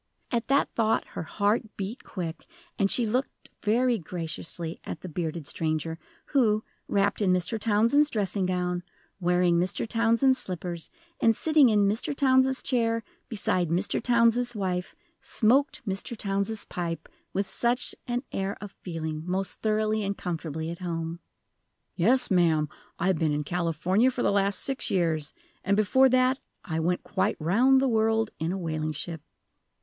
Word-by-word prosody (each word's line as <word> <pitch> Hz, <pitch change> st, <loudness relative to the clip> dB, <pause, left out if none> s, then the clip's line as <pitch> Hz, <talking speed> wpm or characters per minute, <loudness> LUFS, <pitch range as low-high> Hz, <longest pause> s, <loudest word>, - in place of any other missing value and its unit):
At 235 Hz, -3 st, -1 dB
that 275 Hz, +1 st, +2 dB
thought 225 Hz, -1 st, +1 dB
her -, -, -5 dB
heart 210 Hz, +6 st, -1 dB
beat 200 Hz, +6 st, -5 dB
quick, 170 Hz, -4 st, -6 dB, 0.3 s
and 195 Hz, -1 st, +3 dB
she 240 Hz, -, +1 dB
looked 250 Hz, +5 st, -2 dB
very 235 Hz, +2 st, +2 dB
graciously 165 Hz, -1 st, -5 dB
at 160 Hz, -, -6 dB
the -, -, -7 dB
bearded 165 Hz, -2 st, -4 dB
stranger, 160 Hz, +1 st, -2 dB, 0.3 s
who, 220 Hz, -6 st, +3 dB, 0.2 s
wrapped 200 Hz, +1 st, +1 dB
in 190 Hz, -3 st, +3 dB
Mr. 180 Hz, +5 st, 0 dB
Townsend's 230 Hz, +8 st, +3 dB
dressing 200 Hz, -4 st, 0 dB
gown, 180 Hz, -1 st, -1 dB, 0.4 s
wearing 175 Hz, -1 st, +3 dB
Mr. 185 Hz, +5 st, -1 dB
Townsend's 230 Hz, +4 st, +3 dB
slippers, 175 Hz, -2 st, -5 dB, 0.3 s
and 225 Hz, -1 st, +4 dB
sitting 305 Hz, -2 st, +5 dB
in 205 Hz, -2 st, +4 dB
Mr. 225 Hz, +8 st, -1 dB
Townsend's 265 Hz, -1 st, +3 dB
chair, 230 Hz, -3 st, +1 dB, 0.3 s
beside 185 Hz, -6 st, 0 dB
Mr. 180 Hz, +5 st, 0 dB
Townsend's 240 Hz, 0 st, +3 dB
wife, 185 Hz, -3 st, -2 dB, 0.3 s
smoked 255 Hz, +2 st, +1 dB
Mr. 195 Hz, +4 st, -2 dB
Townsend's 200 Hz, +2 st, -1 dB
pipe 170 Hz, -2 st, -4 dB, 0.2 s
with 200 Hz, +1 st, 0 dB
such 240 Hz, +5 st, -1 dB
an 245 Hz, +1 st, -1 dB
air 195 Hz, +1 st, -2 dB
of 205 Hz, -1 st, -8 dB
feeling 160 Hz, -5 st, -5 dB
most 190 Hz, +1 st, -2 dB
thoroughly 215 Hz, 0 st, +1 dB
and 200 Hz, -1 st, -2 dB
comfortably 160 Hz, -2 st, -4 dB
at 170 Hz, -, -7 dB
home! 165 Hz, -2 st, -4 dB, 0.8 s
"Yes, 235 Hz, +9 st, +3 dB
ma'am. 160 Hz, -5 st, +3 dB, 0.3 s
I've 185 Hz, -4 st, +1 dB
been 155 Hz, -2 st, +2 dB
in 150 Hz, 0 st, -1 dB
California 180 Hz, -, +1 dB
for 255 Hz, -1 st, -2 dB
the -, -, +3 dB
last 200 Hz, -1 st, +1 dB
six 270 Hz, -1 st, -2 dB
years. 160 Hz, -5 st, 0 dB, 0.3 s
And 200 Hz, +2 st, +2 dB
before 260 Hz, +6 st, +5 dB
that 255 Hz, +1 st, +3 dB, 0.3 s
I 160 Hz, -1 st, -2 dB
went 175 Hz, +2 st, 0 dB
quite -, -, 0 dB
round 235 Hz, +12 st, +4 dB
the 270 Hz, -, +2 dB
world 225 Hz, -1 st, +2 dB
in 160 Hz, +2 st, -1 dB
a 190 Hz, -, -2 dB
whaling 155 Hz, -3 st, -2 dB
ship!" 160 Hz, +1 st, -6 dB
200 Hz, 155 wpm, -27 LUFS, 170-230 Hz, 0.8 s, sitting